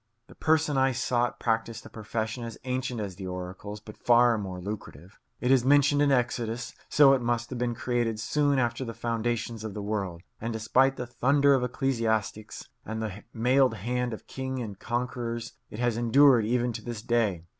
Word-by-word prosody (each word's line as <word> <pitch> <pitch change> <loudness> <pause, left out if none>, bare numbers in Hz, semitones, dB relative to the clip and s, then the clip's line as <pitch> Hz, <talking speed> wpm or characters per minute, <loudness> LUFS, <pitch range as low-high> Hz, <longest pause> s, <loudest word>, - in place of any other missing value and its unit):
The - - -13
person 155 -3 +2
I 135 0 +3
sought 120 0 0
practised 115 0 -1
a - - -10
profession 110 +2 -4
as 115 -2 -7
ancient 125 -1 -2
as 100 -4 -5
the 95 -1 -6
oracles 90 +3 -6
but 110 0 -12
far 120 0 +5
more 95 -3 -5
lucrative. 95 -2 -8 0.2
It 125 - +1
is 130 -3 +5
mentioned 145 +2 +4
in 145 -1 +4
Exodus; 120 -2 -1 0.2
so 140 -2 +7
it 135 - +1
must 120 +1 -1
have 125 - -4
been 120 -1 -1
created 120 -2 -1
soon 145 +5 +1
after 120 0 0
the 115 -2 -6
foundations 115 -1 -2
of 110 -3 -6
the 105 - -4
world; 100 -5 -3 0.2
and 115 +1 -2
despite 125 +5 +2
the 125 - -4
thunder 140 +4 +3
of 130 -2 +2
ecclesiastics 115 -5 -1 0.2
and 110 0 -5
the 105 -2 -5
mailed 125 +1 +3
hand 125 +4 -2
of 110 - -7
kings 130 0 -4
and 105 -4 -6
conquerors, 120 -1 -3 0.2
it - - -9
has 120 -1 0
endured 120 -1 +5
even 120 0 +1
to - - -6
this 115 -2 -6
day. 105 -8 0
120 Hz, 190 wpm, -28 LUFS, 110-125 Hz, 0.2 s, so